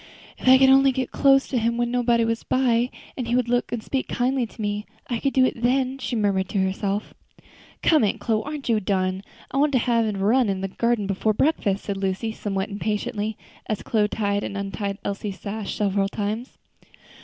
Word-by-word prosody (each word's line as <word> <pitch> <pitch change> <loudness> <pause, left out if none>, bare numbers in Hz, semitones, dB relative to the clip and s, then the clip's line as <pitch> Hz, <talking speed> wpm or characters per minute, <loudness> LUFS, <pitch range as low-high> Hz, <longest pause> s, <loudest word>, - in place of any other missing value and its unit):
"If - - -6
I 260 0 +9
could 265 0 +5
only 270 0 +6
get 260 0 -3
close 270 -1 +4
to 255 - +1
him 230 +1 0
when 240 0 0
nobody 240 -2 +2
was 230 0 -1
by, 245 -2 +2 0.3
and 250 -3 -4
he 240 - +1
would 250 -1 +1
look 245 0 0
and 235 -2 -3
speak 265 -1 -2
kindly 250 0 0
to 225 - -20
me, 205 0 -2 0.2
I 235 - 0
could 275 - 0
do 260 -1 +4
it 235 - -2
then," 260 +2 +1
she 250 -1 -3
murmured 200 -3 +1
to - - -2
herself. 195 +2 -1 0.7
"Come, 310 -6 +4
Aunt 205 - 0
Chloe, 220 -2 0
aren't 295 -1 -6
you 225 -3 +3
done? 185 -2 -1 0.3
I - - -2
want 285 +1 +3
to - - +5
have 230 -2 +2
a 210 -2 -2
run 220 +4 +3
in 190 -1 -1
the 195 - -1
garden 235 +1 0
before 200 +2 0
breakfast," 215 -8 +1
said 200 -1 -3
Lucy, 195 +3 -2
somewhat 200 -2 -3
impatiently, 210 +1 -2 0.3
as 215 - -2
Chloe 215 -2 +1
tied 205 -1 -1
and 200 - -4
untied 200 0 -3
Elsie's 200 0 -4
sash 210 0 -4
several 200 -1 +1
times. 215 +5 -4
220 Hz, 210 wpm, -24 LUFS, 200-250 Hz, 0.7 s, I